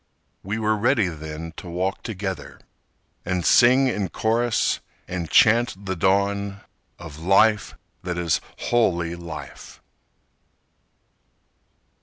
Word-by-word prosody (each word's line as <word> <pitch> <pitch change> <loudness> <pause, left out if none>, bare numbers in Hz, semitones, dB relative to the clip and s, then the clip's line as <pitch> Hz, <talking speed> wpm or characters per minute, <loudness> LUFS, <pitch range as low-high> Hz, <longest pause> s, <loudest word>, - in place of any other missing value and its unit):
We 100 +3 -4
were 110 -1 +1
ready 110 -2 +2
then 80 +1 -7
to 90 - -8
walk 90 +3 -2
together 95 -6 -6 0.6
And 90 -1 -2
sing 130 +2 +6
in 105 -7 -1
chorus 115 +3 0 0.3
and 85 -3 -4
chant 110 -3 +3
the 95 -1 -2
dawn 100 +2 0 0.4
Of 80 -3 -10
life 100 +5 +3 0.3
that 90 -1 -4
is 85 -2 0 0.2
wholly 85 -8 0
life. 85 -3 -9
95 Hz, 105 wpm, -23 LUFS, 85-110 Hz, 0.6 s, sing